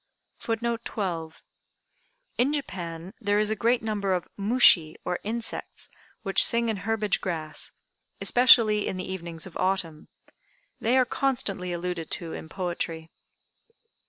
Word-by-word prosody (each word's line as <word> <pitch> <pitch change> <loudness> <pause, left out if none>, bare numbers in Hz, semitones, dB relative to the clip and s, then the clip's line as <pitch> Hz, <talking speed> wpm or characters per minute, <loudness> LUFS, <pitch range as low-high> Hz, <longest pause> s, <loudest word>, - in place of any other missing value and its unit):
] - - -49
[Footnote 230 0 -1
12: 165 -6 -4 1.0
In 255 +4 +4
Japan 175 - -5
there 205 -1 +2
is 210 0 +2
a - - +1
great 230 +2 +1
number 205 -3 0
of 180 - -4
"mushi" 200 -7 +5
or 180 - -1
insects, 230 +2 -4 0.3
which 195 -2 +6
sing 235 0 +2
in 220 - -1
herbage 210 0 0
grass, 160 -4 -3 0.5
especially 230 -4 +6
in 190 - -3
the 185 - -4
evenings 170 -3 -4
of 185 - -11
Autumn. 185 -5 -1 0.7
They 240 +4 +2
are 255 - +5
constantly 235 -9 -1
alluded 175 -1 -3
to 165 -2 -3
in 160 - -7
poetry. 170 -2 -4
195 Hz, 135 wpm, -27 LUFS, 175-225 Hz, 1.0 s, which